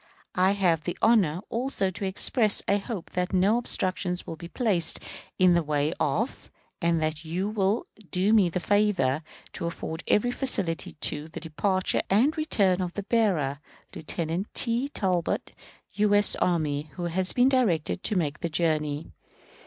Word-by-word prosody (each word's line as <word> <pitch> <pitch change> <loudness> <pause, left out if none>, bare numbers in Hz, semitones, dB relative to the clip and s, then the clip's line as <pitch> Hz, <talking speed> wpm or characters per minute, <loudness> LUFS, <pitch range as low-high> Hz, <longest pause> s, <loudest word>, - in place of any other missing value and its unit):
I 185 +2 +3
have 175 -6 +1
the 175 - -3
honor 195 -8 +3
also 230 -5 -1
to 195 - -5
express 210 +3 +2
a 200 - +3
hope 200 -3 -6
that 180 +1 -2
no 195 +5 +3
obstructions 185 -5 0
will 165 - -6
be 170 +1 -9
placed 195 -5 0 0.4
in 185 -1 +5
the 170 - +3
way 150 0 0
of, 210 - -1 0.3
and 170 -1 +2
that 155 0 -2
you 175 +5 -2
will 205 +1 0 0.2
do 195 +4 +2
me 200 -5 +5
the 175 - -2
favor 185 -9 +1 0.3
to 170 - -3
afford 165 -1 -5
every 245 +4 +2
facility 190 -11 -1
to, 150 +1 -1
the 160 - -8
departure 185 +4 0
and 245 +11 +3
return 200 - +1
of 180 -1 -4
the 205 - -3
bearer, 180 - +1 0.3
Lieutenant 165 +4 -3
T. 240 +3 0
Talbot, 185 - -1 0.4
U. 205 0 +2
S. 205 0 +4
Army, 155 -4 0
who 180 - -6
has 180 +2 0
been 245 +1 +3
directed 190 - +1
to 215 - 0
make 155 -5 -1
the 170 - -2
journey. 155 -2 -1
185 Hz, 160 wpm, -26 LUFS, 165-210 Hz, 0.4 s, in